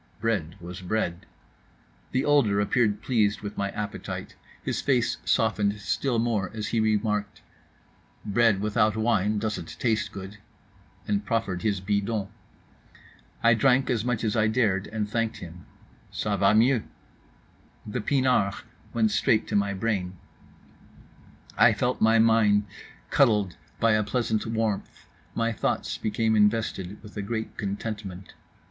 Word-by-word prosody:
Bread 100 -9 -1
was 90 +1 -8
bread. 90 -2 -2 0.8
The 130 +2 0
older 135 -9 +3
appeared 105 0 +1
pleased 110 -4 +1
with 105 0 -6
my 100 0 -1
appetite; 105 +1 -5 0.3
his - - -2
face 120 -3 +1
softened 105 -2 +1
still 120 +4 -1
more, 115 -5 0
as 105 -1 -3
he 115 - 0
remarked: 105 -1 0 0.8
"Bread 105 -1 +3
without 105 0 +1
wine 110 -2 +1
doesn't 105 -5 -4
taste 115 -3 0
good," 100 +1 -9 0.7
and 100 0 0
proffered 105 -5 -1
his 100 -2 0
bidon. 100 +1 -1 1.1
I 115 0 +6
drank 130 +3 +3
as 115 -3 0
much 125 -2 -1
as 110 -1 0
I 110 -1 +3
dared, 110 -4 +1
and 110 -1 -3
thanked 115 +1 -1
him: 85 +1 -11 0.4
"Ça 105 -1 -1
va 100 +2 +4
mieux." 120 +2 +4 1.0
The 105 - -3
pinard 125 -5 +2 0.4
went 110 -2 +3
straight 110 +1 +2
to 105 - -1
my 100 0 +2
brain, 95 -3 -2 1.4
I - - +7
felt - - -1
my 110 +1 +5
mind 110 -2 +4 0.5
cuddled 105 -5 +3 0.2
by 115 - +4
a 110 0 +3
pleasant 110 0 -1
warmth, 110 -2 -2 0.3
my 115 0 +1
thoughts 110 - -2
became 110 +1 0
invested 105 -2 +1
with 105 - -12
a - - -1
great 110 +2 -4
contentment. 100 -2 -5
105 Hz, 135 wpm, -26 LUFS, 100-115 Hz, 1.4 s, I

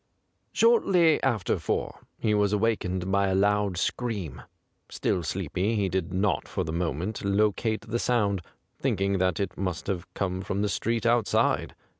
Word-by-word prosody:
Shortly 185 - +4
after 120 -8 0
four - - -2 0.2
he 110 - 0
was 105 -1 +2
awak 110 +1 +2
ened 90 0 -3
by 100 0 +3
a 95 - +1
loud 100 -1 +2
scream. 100 - -2 0.5
Still 90 - -1
sleepy, 95 +5 -1
he 100 -3 +1
did 90 -2 -2
not 95 +1 0
for - - -2
the 80 - -4
moment 85 +4 -2
locate 105 +2 +1
the 115 +1 -3
sound, 105 -7 +1 0.4
thinking 100 0 0
that 95 +3 +1
it 100 -2 -2
must 90 -4 -3
have 95 -2 -4
come 95 -1 -2
from 100 +2 -2
the 105 - 0
street 115 +4 -1
outside. 120 -3 +2
100 Hz, 160 wpm, -27 LUFS, 95-110 Hz, 0.5 s, Shortly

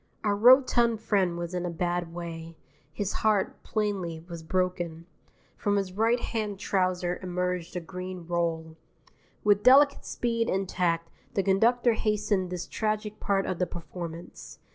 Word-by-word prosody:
Our 205 -2 +2
rotund 240 0 +5
friend 195 -6 +1
was 170 +1 -4
in 180 -1 -2
a 175 - -2
bad 175 0 -2
way. 165 -1 -7 0.3
His 205 -2 -3
heart, 210 -3 +1
plainly, 190 -7 -2
was 170 -2 -7
broken. 175 -1 -2 0.5
From 205 0 0
his 195 -2 -1
right 225 +4 +2
hand 215 -4 -3
trouser 185 -2 0
emerged 180 -1 -2
a - - 0
green 180 +1 -7
roll. 165 -2 -2 0.7
With 205 -1 +4
delicate 280 +4 +6
speed 230 -1 -1
and 195 0 0
tact 170 -2 0 0.2
the 195 - +2
conductor 230 +5 +3
hastened 210 -4 0
this 180 -1 -4
tragic 215 -1 -2
part 195 -1 +1
of 185 - -3
the 180 - +1
performance. 170 0 -8
185 Hz, 145 wpm, -28 LUFS, 175-210 Hz, 0.7 s, delicate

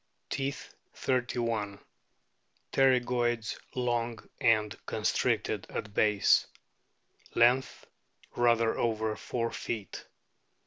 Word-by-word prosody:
Teeth, 140 +1 -3 0.2
3 125 -2 0
1. 110 -4 -1 1.0
Pterygoids 120 -4 +2 0.2
long 120 -2 0 0.2
and 105 -3 +3
constricted - - 0
at 105 -1 -5
base. 105 -2 +4 0.9
Length, 125 +3 +3 0.5
rather 115 -1 +3
over 110 -2 0
four 115 0 -3
feet. 105 -5 -5
115 Hz, 80 wpm, -30 LUFS, 110-125 Hz, 1.0 s, base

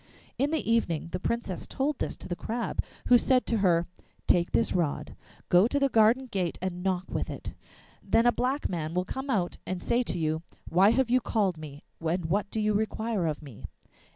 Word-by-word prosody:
In 280 +3 +2
the 315 0 -1
evening 170 -9 +1
the 180 - -2
Princess 205 -4 -3
told 280 +1 -1
this - - -2
to - - -9
the 175 - -2
Crab, 230 +6 -3 0.2
who 245 -1 +6
said 255 0 +3
to 230 - +1
her, 175 -3 +3 0.4
'Take 175 -1 +3
this 230 - +2
rod, 150 -4 -1 0.3
go 180 +5 +5
to 285 - -1
the 275 -1 +3
garden 230 +3 +4
gate 190 -8 -2
and 180 -1 -4
knock 185 -1 0
with - - -2
it, - - -6 0.5
then 230 - +2
a 240 - +6
black 260 +4 -1
man 165 -2 -3
will 180 0 +1
come 265 +7 -5
out 190 -8 0
and 185 -1 -4
say 240 +1 +2
to 245 - -3
you, 160 -1 0 0.3
''Why 185 +4 +5
have 240 0 +1
you 255 0 +4
called 205 -6 +1
me, 145 -2 -9 0.2
and 170 +1 0
what 200 +5 0
do 220 - -3
you 215 0 +2
require 220 -2 -1
of 155 0 -3
me? 135 -8 -10
200 Hz, 210 wpm, -28 LUFS, 175-235 Hz, 0.5 s, who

